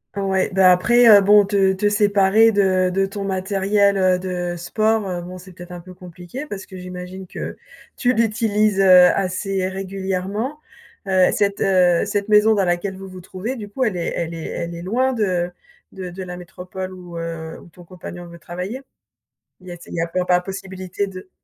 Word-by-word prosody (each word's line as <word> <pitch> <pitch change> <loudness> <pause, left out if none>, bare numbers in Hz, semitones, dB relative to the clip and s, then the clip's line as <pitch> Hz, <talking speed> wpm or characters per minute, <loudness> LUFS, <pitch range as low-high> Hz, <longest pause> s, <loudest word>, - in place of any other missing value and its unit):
Ouais, 195 -1 0
bah 190 -1 +6
après, 235 +7 +4
heu, 205 -2 +9
bon, 205 +1 +6
te 195 0 +1
séparer 205 +1 +4
de 185 -3 +2
de 195 +1 +1
ton 200 +1 -6
matériel, 195 +1 +1
heu, 185 -1 +2
de 180 -1 -3
sport, 215 +4 0
heu, 175 -1 -4
bon, 180 +1 -9
c'est 185 +1 -14
peut-être 175 0 -12
un 175 - -7
peu 185 +1 -13
compliqué. 180 - -9
Parce 205 -9 -8
que 190 - -10
j'imagine 180 +1 -8
que - - -7 0.4
tu 250 0 +2
l'utilises, 215 -2 +1
heu, 185 -2 +7
assez 190 0 -1
régulièrement, 195 +7 -4 0.5
heu, 185 -1 +3
cette, 200 -1 0
heu 180 -2 +3
cette 205 0 -2
maison 210 +1 +5
dans 200 -2 +1
laquelle 175 +2 -1
vous 195 0 -9
vous 185 0 -10
trouvez, 190 +8 -5
du 210 -3 -8
coup, 260 +5 -2
elle 190 -5 -1
est 170 - -3
elle 170 0 -3
est 160 - -7
elle 170 0 -5
est 170 - -8
loin 255 +7 0
de 180 -6 0 0.4
de 185 -2 -7
de 190 +2 -7
la 180 -1 -7
métropole 185 +1 -8
où, 175 -2 -10
heu, 165 -1 -6
ou - - -16
ton 175 +2 -16
compagnon 175 0 -10
veut 170 - -12
travailler? 180 +10 -6 0.8
Il 185 - -17
y - - -7
a 175 - -6
s 170 - -17
il - - -11
y 165 - -1
a 170 - -1
peu 180 +2 -2
pas 180 0 +3
possibilité 190 0 -5
de 185 -1 -10
190 Hz, 200 wpm, -20 LUFS, 180-205 Hz, 0.8 s, heu